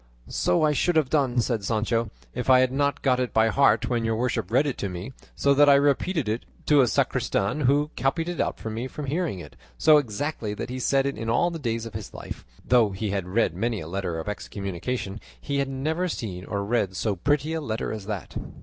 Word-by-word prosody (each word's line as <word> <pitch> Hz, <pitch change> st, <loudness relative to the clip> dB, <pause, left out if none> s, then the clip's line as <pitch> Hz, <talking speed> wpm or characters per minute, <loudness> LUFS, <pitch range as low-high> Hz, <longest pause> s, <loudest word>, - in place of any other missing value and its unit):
"So 90 Hz, +11 st, +1 dB
I 155 Hz, -, +4 dB
should 175 Hz, +4 st, +1 dB
have 155 Hz, -5 st, +2 dB
done," 130 Hz, -5 st, +2 dB
said 115 Hz, -3 st, -1 dB
Sancho, 115 Hz, +2 st, 0 dB, 0.2 s
"if 125 Hz, +1 st, -3 dB
I 130 Hz, 0 st, +7 dB
had 130 Hz, -1 st, +2 dB
not 140 Hz, +1 st, 0 dB
got 130 Hz, -2 st, +3 dB
it 125 Hz, -1 st, -2 dB
by 110 Hz, 0 st, +5 dB
heart 115 Hz, -2 st, +3 dB
when 120 Hz, -2 st, 0 dB
your 115 Hz, 0 st, 0 dB
worship 125 Hz, +2 st, -1 dB
read 130 Hz, +6 st, +3 dB
it 140 Hz, -, -1 dB
to 100 Hz, -, -2 dB
me, 90 Hz, +8 st, -6 dB, 0.2 s
so 140 Hz, -, +3 dB
that 145 Hz, +1 st, +6 dB
I 140 Hz, -, +8 dB
repeated 145 Hz, -, +2 dB
it 110 Hz, +3 st, -1 dB, 0.2 s
to 145 Hz, -2 st, +5 dB
a 125 Hz, -, +4 dB
sacristan, 100 Hz, +3 st, 0 dB
who 145 Hz, +3 st, +2 dB
copied 160 Hz, +5 st, 0 dB
it 175 Hz, -1 st, -2 dB
out -, -, -1 dB
for 110 Hz, -, -5 dB
me 115 Hz, +4 st, -3 dB
from 145 Hz, +2 st, -6 dB
hearing 155 Hz, -, -1 dB
it, 85 Hz, -, -10 dB, 0.2 s
so 155 Hz, -1 st, +6 dB
exactly 120 Hz, -3 st, -3 dB
that 125 Hz, -, -5 dB
he 130 Hz, -, -4 dB
said 135 Hz, +1 st, +2 dB
in 115 Hz, -5 st, -3 dB
all 175 Hz, +10 st, +2 dB
the 165 Hz, -, -5 dB
days 115 Hz, -4 st, -2 dB
of 115 Hz, -, -8 dB
his -, -, -7 dB
life, -, -, -8 dB, 0.2 s
though 120 Hz, -4 st, +4 dB
he 100 Hz, +1 st, -3 dB
had 95 Hz, -3 st, -2 dB
read 110 Hz, +6 st, +1 dB
many 115 Hz, -2 st, -1 dB
a 80 Hz, -, -7 dB
letter 90 Hz, -1 st, -3 dB
of 80 Hz, -, -5 dB
excommunication, 100 Hz, +1 st, -4 dB, 0.2 s
he 140 Hz, -1 st, -2 dB
had 140 Hz, -1 st, 0 dB
never 155 Hz, +7 st, -1 dB
seen 95 Hz, -, -5 dB
or 100 Hz, 0 st, -3 dB
read 100 Hz, -4 st, 0 dB
so 105 Hz, +2 st, 0 dB
pretty 145 Hz, -, 0 dB
a 160 Hz, -, -2 dB
letter 115 Hz, -6 st, -3 dB
as 105 Hz, -2 st, -7 dB
that." 105 Hz, -4 st, -5 dB
120 Hz, 230 wpm, -25 LUFS, 105-140 Hz, 0.2 s, I